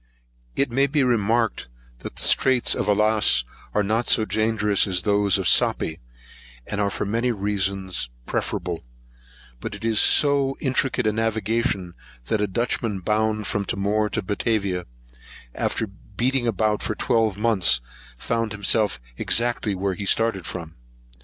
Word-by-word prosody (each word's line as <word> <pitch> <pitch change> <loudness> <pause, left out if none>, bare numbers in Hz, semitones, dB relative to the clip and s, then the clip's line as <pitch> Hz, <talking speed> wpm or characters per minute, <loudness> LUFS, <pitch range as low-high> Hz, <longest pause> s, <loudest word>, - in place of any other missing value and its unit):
It 140 -3 +1
may 135 +3 +3
be 145 0 +1
remarked, 115 -1 +1 0.3
that - - -8
the - - -3
Straits 130 -2 +4
of 100 - -1
Alice 105 - +3 0.3
are 105 - +1
not 110 +4 0
so 110 - +3
dangerous 110 -2 +1
as 90 -2 0
those 100 -2 +3
of - - -3
Sapy - - +5
[Sapi], 80 - -5 0.7
and 105 - -3
are 100 - +1
for 100 - -3
many 115 +4 0
reasons 95 - -2 0.2
preferable; 85 +6 -3 0.8
but 100 - -5
it 105 - -8
is 110 -2 +2
so 140 -2 +3
intricate 130 -2 0
a 110 - +3
navigation 110 -3 -1 0.4
that 110 - +1
a 105 - +1
Dutchman 110 -1 -2
bound 110 +2 0
from 100 - -1
Timor 105 +2 0
to - - -3
Batavia, 100 -3 -1 0.7
after 110 - -1
beating 120 +6 -2
about 110 -1 +1
for 110 - -2
twelve 110 -5 +1
months, 105 - +2 0.4
found 115 - -2
himself 105 - +1 0.2
exactly 115 -3 +1
where 95 +1 -1
he 100 +2 -5
first - - +5
started 115 -6 -1
from. 85 -3 -7
105 Hz, 150 wpm, -23 LUFS, 100-115 Hz, 0.8 s, Sapy